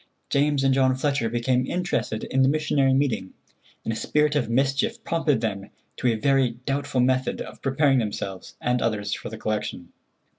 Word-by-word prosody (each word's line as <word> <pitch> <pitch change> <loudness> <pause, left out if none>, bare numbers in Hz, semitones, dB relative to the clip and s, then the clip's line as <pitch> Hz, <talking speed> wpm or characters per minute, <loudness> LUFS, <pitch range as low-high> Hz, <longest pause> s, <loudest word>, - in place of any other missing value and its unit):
James 145 0 +2
and 135 -1 +4
John 130 -1 +3
Fletcher 135 -3 0
became 125 +2 0
interested 175 -11 -2
in 135 - 0
the 130 - +5
missionary 140 -3 +2
meeting, 120 -9 -1 0.5
and 115 - -2
a - - -4
spirit 150 +6 +1
of 140 -6 0
mischief 140 - 0
prompted 155 -7 +1
them 100 -3 -3 0.3
to 125 - 0
a 115 - +3
very 130 0 +2
doubtful 140 -2 0
method 130 +1 +1
of - - -8
preparing 135 0 +3
themselves 100 -4 -4
and 125 0 0
others 105 -3 -1
for - - -5
the 110 - -7
collection. 105 -5 -4
130 Hz, 175 wpm, -25 LUFS, 115-140 Hz, 0.5 s, the